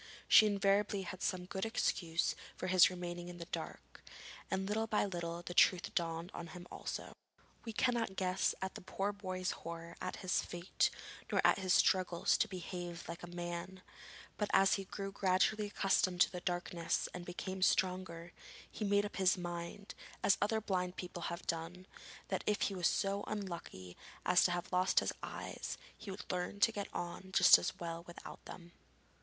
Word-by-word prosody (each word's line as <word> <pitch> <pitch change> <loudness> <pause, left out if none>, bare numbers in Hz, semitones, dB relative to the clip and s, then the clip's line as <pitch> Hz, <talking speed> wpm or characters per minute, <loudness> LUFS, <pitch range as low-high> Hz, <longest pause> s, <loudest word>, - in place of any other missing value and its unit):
She 215 - +8
invariably 200 0 +2
had 185 0 -7
some 180 -1 -1
good 190 +1 -4
excuse 170 -7 +1 0.2
for - - -4
his 185 -1 +7
remaining 175 -1 -5
in 175 - -8
the 170 - -6
dark, - - -7 0.5
and 190 0 0
little 220 +2 0
by 215 -2 +2
little 170 -2 -4
the 175 - -5
truth 180 0 +4
dawned 165 +1 -2
on 170 - -6
him 175 - -9
also. - - -5 0.5
We 225 - -3
cannot 230 -3 +1
guess 185 0 +1
at 190 - -3
the - - -8
poor 195 +2 -2
boy's 185 -2 -3
horror 170 0 -7
at - - -3
his 185 0 0
fate, 175 +1 0 0.4
nor - - +2
at - - +5
his 185 -2 +3
struggles 180 -2 +3
to - - +3
behave 175 -2 -6
like 170 0 -6
a 175 - -7
man, 175 +2 -5 0.5
but 210 - -1
as 195 0 +6
he 195 - -1
grew 195 +1 -5
gradually 195 +3 +2
accustomed 190 -3 +2
to - - +6
his 180 -1 -5
darkness 175 -2 -1
and 180 - -6
became 185 +2 -5
stronger, 180 -2 +1 0.4
he - - -5
made 205 0 +3
up 205 - -6
his 190 -1 +4
mind, 175 +3 -5 0.3
as 200 - +5
other 220 +2 +2
blind 185 -4 -1
people 175 -1 -6
have 170 0 -6
done, 170 +3 -3 0.4
that - - -1
if 210 -1 +1
he 200 - +1
was 180 -2 +2
so 200 +1 0
unlucky 170 - -5 0.3
as 180 0 +5
to 180 - +3
have 175 0 -3
lost 185 +1 +4
his - - -1
eyes, - - -5 0.2
he 215 - -10
would 195 +2 -6
learn 180 +3 -3
to 225 - +5
get 205 -2 -4
on 175 +2 -5
just 180 -1 +9
as - - -3
well 165 -1 -4
without 175 - -10
them. 175 -1 -10
185 Hz, 180 wpm, -35 LUFS, 175-195 Hz, 0.5 s, just